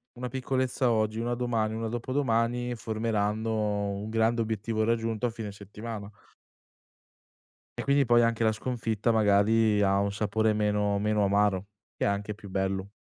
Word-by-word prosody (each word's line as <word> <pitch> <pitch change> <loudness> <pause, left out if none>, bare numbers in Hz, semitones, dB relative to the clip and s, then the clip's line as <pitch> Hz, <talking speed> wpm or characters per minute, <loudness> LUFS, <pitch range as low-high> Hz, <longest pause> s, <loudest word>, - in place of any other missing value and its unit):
1 125 +1 -4
piccolezza 130 -1 0
oggi, 110 0 0
1 120 +1 -1
domani, 115 -3 -1
1 115 0 -3
dopodomani 120 0 0
formeranno 110 -2 -1
un 105 +2 -5
grande 115 +1 +2
obiettivo 110 0 -1
raggiunto 115 0 0
a 120 - 0
fine 110 -3 -6
settimana. 105 +1 -8 1.7
E - - -2
quindi 140 0 +3
poi 120 0 +5
anche 115 0 0
la 110 - +4
sconfitta 115 -1 -1
magari, 105 0 +3
ha 100 0 +3
un 100 0 0
sapore 110 +1 +1
meno 105 -1 +1
meno 105 0 +1
amaro, 100 -1 +2 0.3
e - - -1
anche 100 +1 -1
più 100 -2 -12
bello. 95 0 -1
110 Hz, 150 wpm, -28 LUFS, 105-115 Hz, 1.7 s, poi